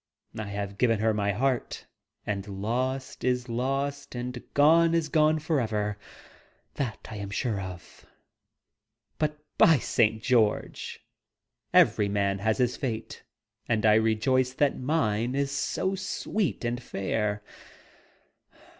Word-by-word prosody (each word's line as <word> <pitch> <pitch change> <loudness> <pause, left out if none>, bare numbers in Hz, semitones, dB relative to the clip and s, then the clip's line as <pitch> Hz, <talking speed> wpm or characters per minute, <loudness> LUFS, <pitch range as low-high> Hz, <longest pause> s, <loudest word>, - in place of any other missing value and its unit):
I 110 - -4
have 100 0 -5
given 115 -3 +3
her 110 +1 +2
my 100 -1 0
heart; 125 +4 -1 0.4
and 100 -1 -3
lost, 125 +7 -3
is 125 0 0
lost; 135 +4 -2
and 125 0 -4
gone, 165 +3 +5
is 160 -2 0
gone 155 0 +4
forever. 110 -10 -1 0.7
That 125 -6 -4
I 110 - -6
am 100 -1 -5
sure 105 0 -1
of. 90 -2 -10 1.1
But, 150 -1 0 0.2
by 165 -2 +7
St. 110 -2 +1
George! 115 -5 0 0.7
every 100 -1 +4
man 100 -1 0
has 110 +2 +1
his 125 -1 +1
fate, 115 -4 -4 0.5
and 110 -1 +1
I 105 - +6
rejoice 115 +4 +2
that 145 +1 +2
mine 125 -4 0
is 140 0 0
so 190 +6 -1
sweet 195 - -2
and 120 +1 -2
fair! 105 -1 -2
120 Hz, 125 wpm, -27 LUFS, 105-140 Hz, 1.1 s, by